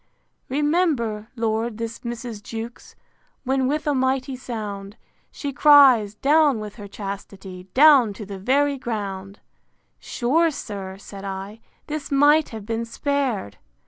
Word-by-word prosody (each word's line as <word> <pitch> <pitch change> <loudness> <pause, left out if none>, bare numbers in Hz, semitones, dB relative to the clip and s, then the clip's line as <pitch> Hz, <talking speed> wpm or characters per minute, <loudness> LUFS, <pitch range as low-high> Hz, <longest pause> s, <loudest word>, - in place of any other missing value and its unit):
VIII. 285 +3 0
Remember, 280 -10 0
Lord, 225 -1 -1
this 230 0 -5
Mrs. 235 -2 -6
Jewkes, 225 +2 -8 0.5
When 265 0 +1
with 300 +3 -1
a 295 - +1
mighty 260 0 0
sound, 210 -5 -6 0.3
She 285 -2 -5
cries, 260 -8 +6
Down 290 0 +3
with 210 0 -8
her 205 -2 -8
chastity, 195 -2 -8
Down 275 -5 +7
to 210 +1 -8
the 195 -1 -8
very 275 +6 +1
ground! 200 -4 -5 0.6
Sure, 320 +8 +1
sir, 195 -9 -6
said 195 0 -11
I, 195 +2 -6 0.3
this 305 -1 -5
might 290 +2 +4
have 220 -3 -8
been 225 +1 -2
spared! 235 - -2
230 Hz, 135 wpm, -23 LUFS, 205-280 Hz, 0.6 s, Down